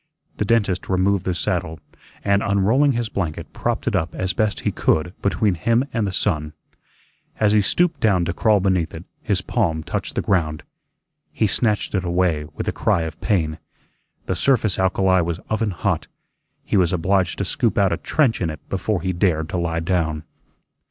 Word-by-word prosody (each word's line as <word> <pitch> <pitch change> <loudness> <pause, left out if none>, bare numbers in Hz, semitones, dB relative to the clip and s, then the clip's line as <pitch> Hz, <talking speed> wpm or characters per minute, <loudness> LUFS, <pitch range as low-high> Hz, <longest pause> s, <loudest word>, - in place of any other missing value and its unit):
The 105 - 0
dentist 100 -5 +1
removed 95 0 +1
the 90 - 0
saddle, 80 -2 -2 0.4
and 100 0 +2
unrolling 110 +9 +3
his 120 -1 -1
blanket, 90 -7 -4
propped - - -2
it - - +1
up 80 +1 -1
as 95 0 -1
best 110 -2 0
he - - 0
could 85 +3 +1
between 100 0 +1
him 115 - +1
and 115 -4 0
the - - -2
sun. 75 -4 -1 0.9
As 105 -1 +3
he 105 - +5
stooped 160 - +1
down 95 -6 +2
to 85 - -2
crawl 105 +1 +3
beneath 95 -3 0
it, - - -7 0.2
his - - 0
palm 80 -1 -1
touched - - -4
the - - 0
ground. 80 -5 0 0.7
He - - 0
snatched 105 +1 +1
it 95 -2 0
away 85 -3 +1
with - - -4
a - - +2
cry 85 - +1
of 80 -1 -7
pain. 80 -6 0 0.7
The - - -1
surface 110 -9 +1
alkali 95 0 +3
was 85 -1 -2
oven 110 0 +1
hot; 90 - -1 0.6
he - - +1
was 90 -3 +3
obliged 90 +1 +1
to 100 - -1
scoop 115 +3 0
out 100 -2 +3
a - - -1
trench 135 -10 +1
in 85 - 0
it 75 -2 -9
before 95 0 -1
he 95 +1 -1
dared 85 -3 +1
to 90 - -2
lie 85 -1 -1
down. 80 -3 -1
95 Hz, 185 wpm, -22 LUFS, 85-105 Hz, 0.9 s, he